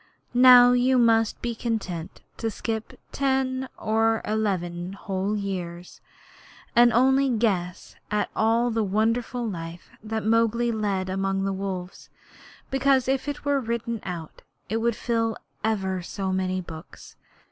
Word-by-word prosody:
Now 245 0 +8
you 250 +1 +3
must 225 -2 +3
be 240 -1 -1
content 195 -7 -4 0.2
to 225 - -2
skip 220 0 -5
ten 265 -1 0
or 225 +1 +1
eleven 185 -4 -2
whole 195 +1 -2
years, 180 -3 -5 0.7
and 240 0 +7
only 265 +3 +4
guess 200 -7 -1
at 210 0 -1
all 230 +2 +2
the 225 -1 0
wonderful 230 +4 0
life 170 -3 -7
Mowgli 225 +2 +1
led 200 -4 -1
among 195 +1 -1
the 195 0 -1
wolves, 190 -2 -5 0.6
because 270 -1 +2
if 270 +1 0
it 290 0 -5
were 285 -1 +2
written 235 -1 -3
out 170 -4 -7 0.3
it 220 - 0
would 230 0 +1
fill 225 -2 -1 0.3
ever 190 -4 -1
so 190 +2 -3
many 185 0 -1
books. 165 -1 -11
220 Hz, 130 wpm, -25 LUFS, 190-240 Hz, 0.7 s, Now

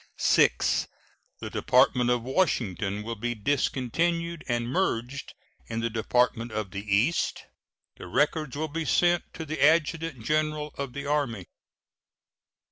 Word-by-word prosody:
VI. - - +5 0.9
The - - -5
Department 125 -1 +3
of 120 -1 +1
Washington 110 - 0
will 115 +2 -4
be 120 +2 -3
discontinued 155 +8 -1
and 120 -1 -1
merged 130 -3 -2 0.3
in 115 0 -3
the 115 0 -1
Department 115 +1 +1
of 105 -3 -3
the 100 - -4
East. 105 +11 +1 0.5
The - - -9
records 145 - 0
will 155 +1 -1
be 160 +2 -3
sent 175 +2 +2
to 160 - -5
the 155 0 -2
Adjutant 155 -4 +2
General 155 0 0
of 140 -3 -5
the 140 +1 -5
Army. 140 -10 -1
130 Hz, 130 wpm, -27 LUFS, 115-155 Hz, 0.9 s, VI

